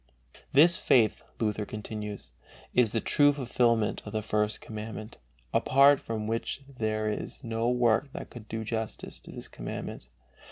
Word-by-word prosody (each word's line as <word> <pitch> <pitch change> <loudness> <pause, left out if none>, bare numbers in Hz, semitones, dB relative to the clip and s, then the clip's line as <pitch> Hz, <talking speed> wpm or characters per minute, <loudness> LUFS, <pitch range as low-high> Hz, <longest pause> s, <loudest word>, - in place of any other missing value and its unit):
This 165 +5 +6
faith, 115 -4 +3 0.2
Luther 105 -1 0
continues, 105 -1 -6 0.4
is 120 -4 +4
"the 115 - +1
true 145 -1 +5
fulfilment 120 -4 +1
of - - -8
the 110 -1 -1
First 105 0 0
Commandment, 110 0 -7 0.3
apart 140 +1 +5
from 110 -2 -4
which 115 +5 -2
there 110 -5 -2
is 105 +6 -4
no 115 0 0
work 125 +2 +2
that - - -7
could 115 -3 -10
do 110 +1 -4
justice 110 0 -4
to - - -12
this - - -7
Commandment." - - -6
110 Hz, 150 wpm, -29 LUFS, 110-125 Hz, 0.4 s, This